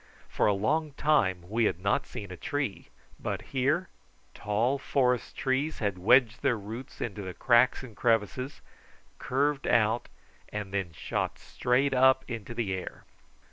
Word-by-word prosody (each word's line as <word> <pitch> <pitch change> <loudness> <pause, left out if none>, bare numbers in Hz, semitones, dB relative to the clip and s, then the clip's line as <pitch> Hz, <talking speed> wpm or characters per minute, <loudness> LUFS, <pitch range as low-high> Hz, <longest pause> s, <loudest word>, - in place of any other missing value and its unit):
For - - +1
a 105 - +4
long 150 +9 0
time 105 - +1
we 115 +3 +1
had 85 - 0
not 100 +2 0
seen 100 -3 -7
a - - -6
tree, 140 +2 -3 0.3
but - - -3
here 140 +8 +1 0.5
tall 115 +7 0
forest 125 -3 0
trees 135 +4 0
had 100 -4 -2
wedged 120 +4 +4
their 120 - +2
roots 110 +5 -8
in 115 - -2
the 95 -3 -6
cracks 120 +1 +4
and 115 -5 -10
crevices, 125 +5 0 0.6
curved 140 +2 0
out, 115 +1 +2 0.4
and 105 -2 -5
then 95 -4 -1
shot - - -3
straight 130 +3 0
up 130 +1 +5
into 115 -1 -6
the 110 -5 -1
air. 95 - -6
120 Hz, 150 wpm, -29 LUFS, 105-135 Hz, 0.6 s, up